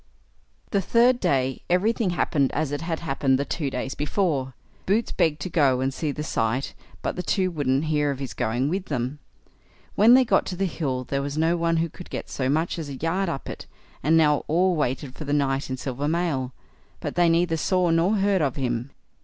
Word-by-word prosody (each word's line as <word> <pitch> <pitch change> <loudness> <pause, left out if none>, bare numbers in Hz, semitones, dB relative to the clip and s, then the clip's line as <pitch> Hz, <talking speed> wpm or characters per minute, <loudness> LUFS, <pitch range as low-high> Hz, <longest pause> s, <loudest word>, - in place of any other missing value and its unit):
The 200 - +2
third 240 +6 +3
day 135 - 0
everything 205 +4 +2
happened 150 -5 +1
as 150 -1 -1
it 145 - -3
had 165 -1 -3
happened 135 -4 +1
the 140 - -1
two 145 -2 -2
days 130 +1 -3
before. 145 -5 -1 0.3
Boots 210 +4 +1
begged 155 -2 +1
to - - -3
go 140 -6 +3
and 135 +1 0
see 150 +2 -2
the 150 +2 -5
sight, 125 -1 -1 0.3
but - - -2
the 180 - -2
two 185 0 0
wouldn't 145 -2 0
hear 150 -2 +1
of 140 - -2
his 135 -1 -5
going 120 +5 0
with 185 +4 -2
them. 130 -1 -3 0.7
When 225 +4 +7
they 260 0 +5
got 195 -4 +2
to 185 - -3
the 195 +2 0
hill 135 -8 -2
there 140 +2 -2
was 140 +1 -4
no 165 +2 +2
one 165 -1 +1
who 165 +1 +1
could 175 +2 -12
get - - -6
so 130 -1 -1
much 160 +4 0
as 155 -3 -5
a 140 - -5
yard 170 +6 -1
up 140 -5 -5
it; - - -7 0.3
and 160 +3 +3
now 150 -2 +4
all 180 +3 +2
waited 135 -2 -2
for 155 - -8
the 145 - -1
knight 135 -2 0
in 130 - -3
silver 135 +2 -3
mail, 155 -6 -1 0.5
but - - -4
they 175 -1 +3
neither 165 0 +2
saw 180 +2 +1
nor 170 +6 +3
heard 195 -2 +2
of 140 -4 0
him. 125 -2 -2
150 Hz, 215 wpm, -25 LUFS, 135-175 Hz, 0.7 s, When